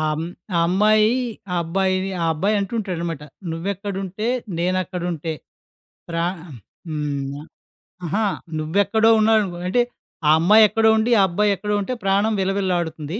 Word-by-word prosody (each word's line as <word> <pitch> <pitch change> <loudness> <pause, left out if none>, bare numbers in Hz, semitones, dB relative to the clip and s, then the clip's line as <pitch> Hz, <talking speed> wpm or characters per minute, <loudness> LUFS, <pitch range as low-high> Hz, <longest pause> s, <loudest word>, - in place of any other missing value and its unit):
ఆహ్, 155 0 -1 0.4
ఆ - - +3
అమ్మాయి, 215 +4 +3 0.4
ఆ - - 0
అబ్బాయిని, 190 +2 0
ఆ - - +1
అబ్బాయి 195 +7 0
అంటూ 200 +1 -3
ఉంటాడనమాట 170 -6 -3 0.3
'నువ్వేక్కడుంటే 195 +3 -4 0.3
నేనక్కడుంటే' 175 -2 -2 0.8
ప్ర 165 - -4 0.7
హ్మ్, 145 -2 -3 0.6
ఆహా! 210 +7 0 0.3
నువ్వు 155 +4 -3
ఎక్కడో 220 +3 +3
ఉన్నావు 220 0 +4
అనుకో 180 -4 -4
అంటే, 245 +6 +2 0.5
ఆ - - +5
అమ్మాయి 210 +7 +6
ఎక్కడో 220 +1 +3
ఉండి, 225 +2 +1
ఆ - - +6
అబ్బాయి 205 +4 +1
ఎక్కడో 210 +2 -2
ఉంటే 255 +6 -3
ప్రాణం 200 +3 +2
విలవిలలాడుతుంది. 180 -3 -2
190 Hz, 130 wpm, -21 LUFS, 165-210 Hz, 0.8 s, అమ్మాయి